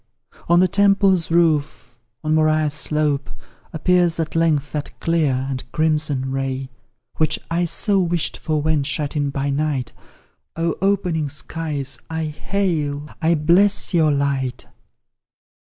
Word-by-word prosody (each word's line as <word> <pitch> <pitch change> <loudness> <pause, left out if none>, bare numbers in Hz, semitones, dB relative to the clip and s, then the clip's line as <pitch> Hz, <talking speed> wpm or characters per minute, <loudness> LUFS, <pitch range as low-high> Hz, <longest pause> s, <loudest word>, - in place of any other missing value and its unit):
on 170 0 +5
the 185 - +5
Temple's 195 -2 +3
roof 150 -8 0 0.2
on 155 0 0
Moriah's 155 -1 +2
slope 150 -2 0 0.4
Appears 175 +1 +2
at 160 -1 -3
length 155 -4 +1
that 150 -1 -5
clear 150 -6 +1
and 130 -2 -5
crimson 150 -4 0
ray 135 0 -3 0.5
Which 155 - +1
I 175 +1 +1
so 195 +4 +1
wished 175 -2 -1
for 155 -2 -2
when 155 -1 +2
shut 145 +1 -2
in 145 -1 0
by 140 +1 -2
night; 140 -3 -1 0.6
Oh, 165 0 0
opening 180 -6 0
skies, 150 -1 -3
I 160 0 -2
hail, 150 -3 -2
I 165 +1 +3
bless 180 +7 +3
pour 160 -4 +3
light! 140 -3 -1
155 Hz, 130 wpm, -21 LUFS, 145-170 Hz, 0.6 s, on